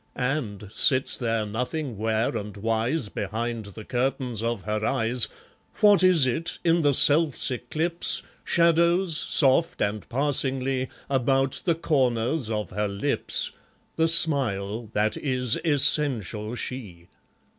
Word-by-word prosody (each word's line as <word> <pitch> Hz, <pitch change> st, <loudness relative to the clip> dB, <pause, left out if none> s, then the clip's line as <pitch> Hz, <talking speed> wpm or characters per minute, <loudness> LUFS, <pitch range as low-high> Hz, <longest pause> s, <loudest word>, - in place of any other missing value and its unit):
And, 125 Hz, -7 st, -3 dB
sits 130 Hz, +3 st, +2 dB
there 115 Hz, -3 st, -2 dB
nothing 125 Hz, +5 st, -4 dB
ware 110 Hz, +3 st, -1 dB
and 105 Hz, -2 st, -6 dB
wise 115 Hz, +6 st, -1 dB
Behind 110 Hz, +3 st, -5 dB
the 100 Hz, +2 st, -11 dB
curtains 125 Hz, -2 st, -2 dB
of 115 Hz, -4 st, -3 dB
her 105 Hz, 0 st, -3 dB
eyes, 115 Hz, +2 st, +1 dB, 0.5 s
What 205 Hz, -4 st, +5 dB
is 180 Hz, -6 st, +4 dB
it, 160 Hz, +7 st, -3 dB
in 170 Hz, 0 st, +2 dB
the 145 Hz, -3 st, +2 dB
self's 145 Hz, -1 st, +5 dB
eclipse, 155 Hz, +8 st, 0 dB, 0.2 s
Shadows, 170 Hz, +1 st, +2 dB
soft 145 Hz, +1 st, +2 dB
and 105 Hz, 0 st, -3 dB
passingly, 135 Hz, -1 st, 0 dB, 0.2 s
About 135 Hz, 0 st, 0 dB
the 170 Hz, -3 st, +1 dB
corners 130 Hz, -4 st, -1 dB
of 105 Hz, -5 st, -4 dB
her 105 Hz, +2 st, -2 dB
lips, 100 Hz, 0 st, -1 dB, 0.4 s
The 160 Hz, 0 st, +2 dB
smile 120 Hz, -, +2 dB
that 105 Hz, +1 st, 0 dB
is 125 Hz, -4 st, 0 dB
essential 125 Hz, -, +2 dB
she? 105 Hz, -9 st, -8 dB
125 Hz, 125 wpm, -24 LUFS, 110-150 Hz, 0.5 s, What